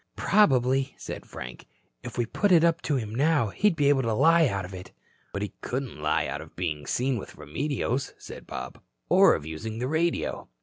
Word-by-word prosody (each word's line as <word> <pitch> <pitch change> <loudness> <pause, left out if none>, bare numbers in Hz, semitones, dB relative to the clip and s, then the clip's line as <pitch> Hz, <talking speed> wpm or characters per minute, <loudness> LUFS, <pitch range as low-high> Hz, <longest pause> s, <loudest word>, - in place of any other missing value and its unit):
"Probably," 135 - +3
said - - -7
Frank, 60 0 -9 0.3
"if - - -8
we 120 - +1
put 200 - 0
it 170 -2 +6
up 170 0 +3
to 150 - 0
him 110 -5 -3
now, 145 -2 +2
he'd 205 - +2
be 145 -3 +2
able 140 -2 +4
to 115 -3 0
lie 165 +5 +5
out 100 -5 -2
of 95 - -10
it." 95 0 -9 0.4
"But 100 - -3
he 105 - -5
couldn't 125 - -4
lie 75 0 +1
out - - -4
of - - -13
being 75 -5 -3
seen 130 0 0
with 100 - -9
Remedios," 130 - -2
said - - -11
Bob. 65 0 -7 0.3
"Or - - +6
of - - -6
using 80 +8 -5
the 125 +2 -2
radio." 160 - -1
125 Hz, 205 wpm, -27 LUFS, 95-150 Hz, 0.4 s, it